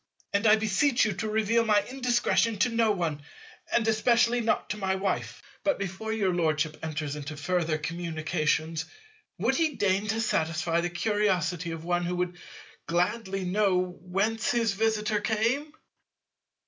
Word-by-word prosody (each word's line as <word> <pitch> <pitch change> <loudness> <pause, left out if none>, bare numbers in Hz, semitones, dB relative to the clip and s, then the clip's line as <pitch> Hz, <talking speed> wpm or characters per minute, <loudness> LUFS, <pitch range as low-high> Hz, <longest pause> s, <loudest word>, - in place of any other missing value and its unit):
And 205 +3 +2
I 215 - +8
beseech 220 +5 +2
you 215 - 0
to 220 - -3
reveal 220 +2 +2
my 210 -2 +3
indiscretion 245 -3 +1
to 225 - +3
no 230 -1 +2
one, 170 -7 -1 0.5
and 230 -1 +2
especially 235 +2 +3
not 225 - 0
to 210 - -3
my 190 -2 0
Wife. 190 0 -3 0.2
But 290 - +2
before 195 +3 -4
your 200 -4 +1
Lordship 155 -2 0
enters 150 -2 -3
into 150 +1 -6
further 165 0 0
communications, 160 -1 -1 0.5
would - - +1
he 320 -4 +1
deign 200 +1 +1
to 220 +2 0
satisfy 165 -4 0
the 175 - -1
curiosity 180 -3 0
of 165 -1 -6
one 175 0 0
who 175 +1 -2
would 180 0 -2 0.5
gladly 190 +2 -1
know 195 0 +2 0.2
whence 205 +5 -1
his 230 -3 +1
visitor 215 0 0
came? 230 +8 0
195 Hz, 150 wpm, -28 LUFS, 170-220 Hz, 0.5 s, I